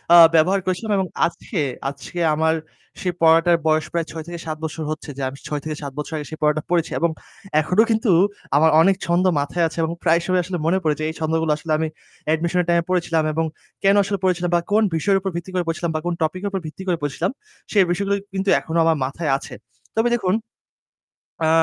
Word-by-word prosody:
আ - - +10 0.2
ব্যবহার 180 +5 +4
করেছিলাম। 185 +4 -2
এবং 190 - +1 0.2
আজকে 170 +3 -4 0.3
আজকে 140 +5 -8 0.2
আমার 160 +1 +2 0.5
সেই 180 -1 0
পড়াটার 165 +1 +5
বয়স 155 0 +2
প্রায় 170 -1 -1
৬-৭ 165 0 -6
বছর 160 0 -4
হচ্ছে 155 - -6
যে - - -5
আমি 135 - -10
৬ 150 -1 -3
থেকে 155 -1 -4
৭ 140 -1 -5
বছর 150 - -5
আগে 150 - -6
সেই 155 - -7
পড়াটা 150 0 +2
পড়েছি। 170 -2 +1
এবং 170 - +2 0.5
এখনো 180 +8 +3
কিন্তু 220 -1 +2 0.4
আমার 160 +2 +5
অনেক 195 +3 +4
ছন্দ 175 +2 +2
মাথায় 165 +4 0
আছে 160 - -10
এবং 160 - -1
প্রায় 170 -1 +4
সময়ই 185 0 +2
আসলে 180 +1 -4
মনে 175 +4 +3
পড়ে 155 -1 +2
যে 155 - -2
এই 160 - -6
ছন্দগুলো 160 0 0
আসলে 155 +1 -6
আমি 160 - 0 0.4
অ্যাডমিশন 165 +3 +1
এর - - -3
টাইম 170 - +4
এ - - -8
পড়েছিলাম। 170 -3 +1
এবং 165 +1 0 0.4
কেন 195 +1 +5
আসলে 200 +1 -2
পড়েছিলাম 180 -1 +1
বা 170 - +3
কোন 215 +2 +4
বিষয়ের 195 +5 +2
উপর 195 - -3
ভিত্তি 175 +2 -5
করে 180 -1 0
পড়েছিলাম 165 0 -1
বা - - +1
কোন 175 - 0
টপিক 160 +4 -2
এর 200 - 0
উপর 195 - -1
ভিত্তি 155 +5 -9
করে 175 -2 +1
পড়েছিলাম। 145 +6 -1 0.4
সেই 200 -3 +5
বিষয়গুলো 200 +3 0 0.2
কিন্তু 195 +1 -1
এখনো 165 0 -3
আমার 165 -1 +3
মাথায় 150 +4 -2
আছে। - - -10 0.4
তবে 225 +2 +3
দেখুন 190 -6 0 1.1
আ - - +3
170 Hz, 215 wpm, -21 LUFS, 160-185 Hz, 1.1 s, আ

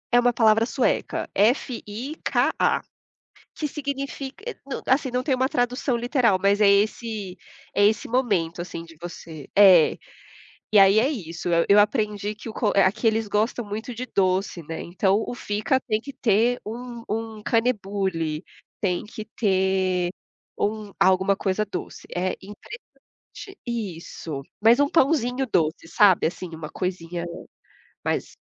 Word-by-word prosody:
É 240 - +7
uma 245 0 +3
palavra 225 -1 +4
sueca, 255 +2 -1
F-I-K-A, 240 +4 0 0.7
que 305 - -3
significa, 275 -1 -5
eh 475 - -4
não 275 -1 -5
assim, 260 0 +2
não 250 +1 -1
tem 280 - +2
uma 260 +1 +1
tradução 250 -2 0
literal 240 -4 +2
mas 200 +2 +3
é 205 - +6
esse 205 -1 0 0.4
é 205 - +4
esse 215 +1 +2
momento, 200 -10 0
assim, 170 -1 -7
de 165 -1 -15
você 160 -4 -9
é. 190 -6 +7 0.7
E 210 - +6
aí 195 +2 +6
é 240 +5 +4
isso, 175 - -4
e 170 0 +3
eu 200 - +6
aprendi 210 -1 +1
que 215 - -10
o - - -5
co 220 -2 0
aqui 195 +3 +3
eles 220 -1 +2
gostam 220 +4 0
muito 215 +4 -5
de 250 +3 -5
doce, 190 -3 0
né, 160 +2 -6
então 190 +4 +1
o - - -4
fika 215 +4 0
tem 215 -4 -1
que 280 +4 -9
ter 235 +1 +2
um 235 +1 -7
um 220 -1 -4
kanelbulle 195 -9 0 0.4
tem 180 -4 0
que 215 0 -8
ter 190 -3 +1 0.5
um 210 -1 -2
alguma 190 +1 +3
coisa 195 +2 0
doce, 200 -3 -7
é 185 +1 0
interessante 210 - -12 0.7
isso. 170 - -5 0.2
Mas 230 +5 +5
um 285 - +4
pãozinho 270 -4 +2
doce, 165 -8 0
sabe, 190 +2 +4
assim, 180 +2 -4
uma 155 -1 -7
coisinha 175 -2 -4 0.8
mais. - - -2
210 Hz, 145 wpm, -24 LUFS, 190-245 Hz, 0.8 s, É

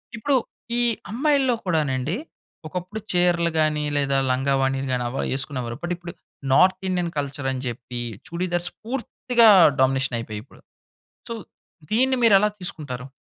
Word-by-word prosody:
ఇప్పుడు, 270 +5 +1 0.4
ఈ - - +2 0.3
అమ్మాయిల్లో 270 0 +2
కూడానండి. 150 -3 0 0.5
ఒకప్పుడు 180 +6 -5
చీరలు 175 -1 +2
గానీ, 155 -1 +1
లేదా 140 -1 +1
లంగా 135 +2 +1
ఓణీలు 135 0 0
గానీ, 125 -1 0
అవా 130 - -3
యేసుకునేవారు, 130 -3 -3
బట్ 175 +1 -1
ఇప్పుడు 175 0 -9 0.4
నార్తిండియన్ 185 +1 +2
కల్చరని 140 -2 -2
చెప్పీ, 120 0 -5 0.3
చుడీదార్స్ 175 0 -1
పూర్తిగా 235 -1 +2 0.3
డామినేషనయిపోయాయి 130 -5 0
ఇప్పుడు. - - -20 0.7
సో, - - -2 0.6
దీన్ని 260 +4 +3
మీరెలా 210 -2 +6
తీసుకుంటారు? 140 -8 -5
165 Hz, 120 wpm, -23 LUFS, 135-190 Hz, 0.7 s, మీరెలా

